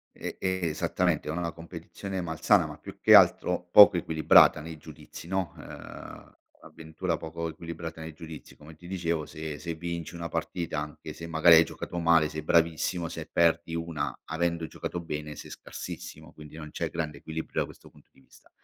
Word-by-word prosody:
E - - -6
e 95 0 -1
esattamente, 75 - 0
è 75 - -1
una 90 - -3
la 85 -1 -2
competizione 85 +4 -7
malsana, 80 -2 +2
ma - - -9
più - - -11
che - - +8
altro, 90 0 +4
poco 100 -3 +9
equilibrata 80 -1 +5
nei 80 +1 -8
giudizi, 75 +1 -12
no. 95 -1 -2
Uhm, - - -11 0.3
avventura 80 +2 -4
poco 80 +1 -5
equilibrata 80 0 -7
nei 80 0 -7
giudizi, 80 -1 -11
come 75 +1 -14
ti 85 +3 -14
dicevo, 85 -4 -2
se 75 -1 -6
se 85 -1 -5
vinci 85 0 -5
1 85 -1 -5
partita, 85 -4 -3
anche 75 0 -7
se 85 - -8
magari 80 +1 +6
hai 80 - +8
giocato - - -7
male, 80 -2 +4
sei 80 0 -6
bravissimo, 85 +1 +1
se - - -7
perdi 85 -1 +2
1 85 -1 -3
avendo 85 0 -1
giocato 85 - -5
bene, 75 -2 -5
sei - - -10
scarsissimo, - - -8
quindi 75 0 -13
non 75 -1 -8
c'è - - -3
grande 80 -3 -4
equilibrio, 80 0 -4
da - - 0
questo - - -15
punto - - -22
di 65 - -23
vista. - - -22
80 Hz, 185 wpm, -28 LUFS, 80-85 Hz, 0.3 s, poco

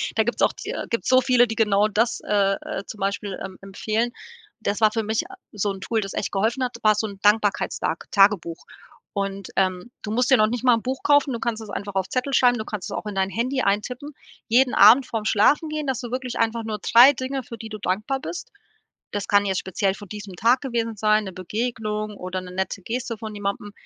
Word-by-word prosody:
da - - +3
gibt's - - -3
auch - - +4
de - - -5
gibt's 230 - -2
so 255 0 +6
viele, 250 -1 +4
die 225 - -4
genau 210 -1 +3
das, 230 +3 0
äh, 200 -1 +2
äh, - - -5
zum 215 - -9
Beispiel, 200 0 -2
em 190 0 -7
empfehlen. 215 +4 -2 0.5
Das 205 -1 -1
war 215 -1 +4
für 225 0 -1
mich 220 - -2
a 385 - -10 0.2
so 205 -1 -1
'n 190 - -10
Tool, 225 +3 -1
das 195 -2 -4
echt - - -3
geholfen 225 +6 0
hat 250 -1 -3
war 215 -1 +4
so 220 +1 -1
'n 200 -2 -10
Dankbarkeitstagsdag 205 -5 +1
Tagebuch 195 -5 +3 0.5
und, 195 -1 -4
ähm, 185 +3 0
du 210 - -5
musst 250 +4 +1
dir 260 - +7
noch 215 - +4
nicht 240 +2 -3
mal 250 -1 +6
'n 225 - -3
Buch 260 +2 -4
kaufen, 290 -2 +3
du 235 - -3
kannst 230 -2 -2
es 220 - -9
einfach 200 0 -5
auf 190 -1 0
Zettel 260 +2 -2
schreiben, 245 -1 +4
du 220 - -3
kannst 210 -5 -5
es - - -5
auch - - -6
in 210 -1 -5
dein 190 0 +1
Handy 255 +6 -1
eintippen, 245 +8 -1 0.4
jeden 250 +2 +3
Abend 235 +6 +7
vor'm 225 -3 -4
Schlafengehen, 300 +8 +2
dass 265 -2 -1
du 245 -3 -6
wirklich 255 0 -4
einfach 230 0 0
nur 215 -1 -4
3 245 +4 +7
Dinge, 265 0 -4
für 230 - -9
die 225 - -8
du 215 -1 -7
dankbar 215 +8 -2
bist. 430 - -7 0.6
Das 205 -1 -3
kann 205 0 +4
jetzt 190 -2 0
speziell 190 +1 -1
von 205 -1 -12
diesem 205 -3 -8
Tag 235 +7 +3
gewesen 230 -4 -2
sein, 215 +1 +3
'ne 190 - -6
Begegnung 215 +2 -3
oder 185 +1 -4
'ne 180 0 -10
nette 190 +2 -3
Geste 230 +3 -4
von 215 0 -7
jemandem. 205 0 -4
215 Hz, 230 wpm, -23 LUFS, 200-245 Hz, 0.6 s, dir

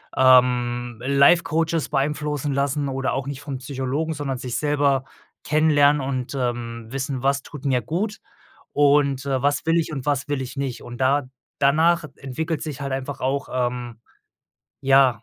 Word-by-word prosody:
ähm, 125 -2 +3
Life-Coaches 160 +3 +3
beeinflussen 150 0 -1
lassen 140 +1 0
oder 135 -1 -1
auch 135 +1 -3
nicht 140 -1 -5
vom 140 -2 -5
Psychologen, 135 +4 -3
sondern 140 -3 -3
sich 125 -1 -4
selber 145 -3 +1 0.4
kennenlernen 150 -1 +4
und, 130 -1 -3
ähm, 120 -3 -3
wissen, 135 0 -3
was 140 +1 +1
tut 145 -1 -10
mir 130 -3 +2
gut 190 - -3 0.5
und, 140 -2 +3
äh, 135 -2 0
was 145 +2 +1
will 165 +1 +3
ich 160 -1 -1
und 135 -4 -5
was 145 -1 0
will 145 -2 -1
ich 130 - -8
nicht 135 -3 -3
und 120 0 -9
da 135 +2 +3 0.4
danach 160 +4 +3
entwickelt 155 +4 -3
sich 150 -3 -5
halt 140 -1 -3
einfach 135 +1 -4
auch, 135 +1 -1
ähm 120 -2 -3 0.8
ja. 135 -4 +4
140 Hz, 160 wpm, -23 LUFS, 130-145 Hz, 0.8 s, kennenlernen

